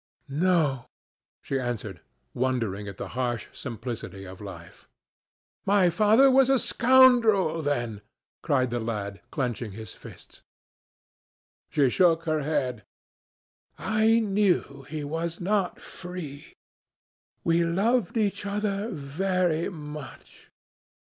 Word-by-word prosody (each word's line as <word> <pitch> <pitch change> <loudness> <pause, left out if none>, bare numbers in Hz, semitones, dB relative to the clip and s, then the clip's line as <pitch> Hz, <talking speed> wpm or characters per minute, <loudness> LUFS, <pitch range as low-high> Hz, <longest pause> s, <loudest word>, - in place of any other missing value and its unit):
"No," 150 -4 +1 0.6
she 135 - -1
answered, 110 -6 -4 0.3
wondering 115 -6 -1
at 100 -2 -8
the - - -6
harsh 120 -2 -2
simplicity 115 -6 -6
of 95 +1 -10
life. 90 -4 -11 0.7
"My 195 -3 +4
father 215 +9 +5
was 265 0 +5
a 270 - +5
scoundrel 230 -10 +4
then!" 120 -8 -2 0.4
cried 130 -6 +1
the 120 - -1
lad, 105 -3 -4
clenching 120 -6 -3
his 110 +1 -9
fists. - - -14 1.3
She 145 -4 +3
shook 165 0 +3
her 155 -2 0
head. 135 -7 -1 0.9
"I 220 +1 +3
knew 195 - 0
he 155 0 -4
was 165 +3 -3
not 195 0 0
free. 175 -6 -9 0.9
We 170 0 +3
loved 200 +6 +1
each 205 -2 0
other 205 +1 -2
very 170 +2 -1
much. 150 -4 -10
155 Hz, 110 wpm, -27 LUFS, 125-195 Hz, 1.3 s, father